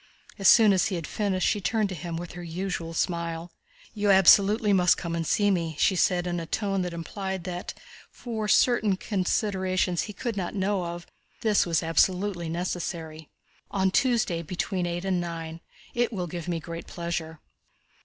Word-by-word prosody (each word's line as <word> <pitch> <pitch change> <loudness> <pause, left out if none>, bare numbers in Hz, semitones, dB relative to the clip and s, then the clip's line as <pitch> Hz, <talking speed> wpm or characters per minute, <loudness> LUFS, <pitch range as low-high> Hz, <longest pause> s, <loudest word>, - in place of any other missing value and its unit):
As 195 - +3
soon 220 -4 +7
as 185 - +2
he 195 - -2
had 165 -2 -4
finished 195 -3 -1
she 205 - +1
turned 215 +2 +1
to - - -4
him 170 0 -5
with 175 0 -6
her 175 - -8
usual 170 -1 -4
smile. 170 -1 -2 0.4
"You 205 -2 0
absolutely 200 +3 +6
must 180 -2 +4
come 170 -1 -4
and 165 -1 -2
see 205 -1 +3
me," 165 -4 -1
she 190 - +3
said 180 0 +2
in 175 -1 -2
a 165 - -6
tone 195 -1 -1
that 180 -1 -3
implied 190 +2 -5
that, 180 0 -5 0.3
for 220 -3 -5
certain 215 -4 +3
considerations 185 -2 0
he 210 - -6
could 235 +1 -4
not 190 0 -3
know 195 -1 0
of, 170 0 -6 0.4
this 210 -5 +2
was 165 -1 +1
absolutely 175 +2 +1
necessary. 165 -2 -4 0.4
"On 190 -1 +1
Tuesday 225 -9 +1
between 180 +2 -2
eight 175 +2 -3
and 185 -2 +1
nine. 165 -1 -6 0.3
It 240 0 +1
will 185 -5 -3
give 170 0 -6
me 170 -2 -1
great 165 +1 -8
pleasure." 165 -2 -4
180 Hz, 175 wpm, -26 LUFS, 170-200 Hz, 0.4 s, soon